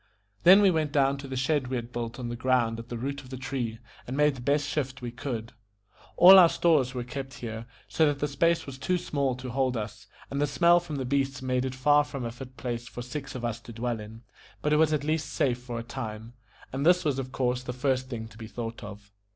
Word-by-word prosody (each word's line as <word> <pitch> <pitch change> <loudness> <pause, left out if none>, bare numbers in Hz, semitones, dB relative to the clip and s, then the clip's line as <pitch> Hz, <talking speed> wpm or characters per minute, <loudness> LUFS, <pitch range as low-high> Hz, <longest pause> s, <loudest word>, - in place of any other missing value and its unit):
Then 190 +4 +8
we 195 - +6
went 155 -3 0
down 140 -1 +2
to 140 - -7
the 130 - -5
shed 135 +1 +1
we 130 - -3
had 120 0 -4
built 120 -1 -4
on 120 -2 -5
the 120 - -3
ground 120 -2 +1
at 115 +1 -9
the 120 - -4
root 140 +4 -4
of 130 - -15
the 130 - -6
tree, 125 -3 -3 0.3
and 130 +3 -4
made 150 0 +4
the 130 - -9
best 145 +3 +1
shift 135 -3 -2
we 120 - -4
could. 120 -3 -5 0.6
All 190 +2 +10
our 175 -2 +8
stores 155 -6 +2
were 125 - -2
kept 135 +2 -6
here, 115 -3 -6 0.2
so 160 - +3
that 145 -1 0
the 150 - -1
space 165 +3 +1
was 135 -1 -8
too 180 +7 +1
small 140 -6 -1
to 130 0 -7
hold 130 -1 0
us, 105 -1 -6 0.2
and 140 +1 -1
the 145 - +2
smell 170 +6 +5
from 170 -3 -7
the 135 -2 -3
beasts 135 +1 -1
made 130 0 0
it 130 0 -4
far 145 +3 +4
from 140 -4 -6
a 115 - -3
fit 130 +2 -11
place 120 -1 -4
for 120 -2 -7
six 135 +2 -6
of 120 -2 -4
us 120 -1 -2
to 120 - -11
dwell 115 0 -3
in; 110 +2 -10 0.4
but 150 - +2
it - - +5
was 155 0 +4
at 150 -2 0
least 155 -1 -1
safe 125 -3 +1
for 120 -1 -6
a 115 - -4
time, 115 -2 -6 0.4
and 135 +1 -2
this 175 +2 +4
was 140 -3 +1
of 130 -1 -5
course 125 -1 0
the 125 - -5
first 130 0 -1
thing 115 -3 -5
to 110 +1 -16
be 110 - -7
thought 115 0 -6
of. 105 0 -10
130 Hz, 255 wpm, -28 LUFS, 120-145 Hz, 0.6 s, All